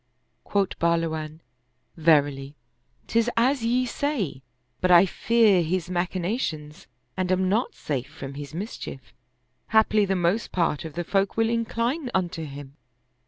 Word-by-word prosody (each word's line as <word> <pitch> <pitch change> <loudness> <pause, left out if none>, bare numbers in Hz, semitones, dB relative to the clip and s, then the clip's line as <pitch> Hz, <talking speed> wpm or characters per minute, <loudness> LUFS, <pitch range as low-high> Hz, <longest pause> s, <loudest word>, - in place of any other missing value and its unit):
Quoth 200 -2 -1
Bahluwan, 160 -2 -1 0.3
" 130 +1 -46
Verily, 145 -3 +2 0.5
'tis 230 +1 +1
as 255 +2 +2
ye 245 +2 +2
say; 235 - -2 0.4
but 185 - +1
I 175 +1 +8
fear 215 -2 +3
his 175 +2 -2
machinations 175 - -3 0.3
and 185 -1 -1
am 185 0 +2
not 215 +6 0
safe 135 -4 -3
from 135 0 -8
his 145 0 -7
mis 190 +8 -5
chief; 135 - -9 0.5
haply 220 -1 +4
the 190 0 0
most 180 +5 0
part 165 -4 0
of 160 - -7
the 175 +3 -3
folk 195 +4 0
will 225 0 +3
incline 235 +5 -1
unto 175 -3 -1
him." 140 -1 -10
180 Hz, 145 wpm, -25 LUFS, 155-220 Hz, 0.5 s, I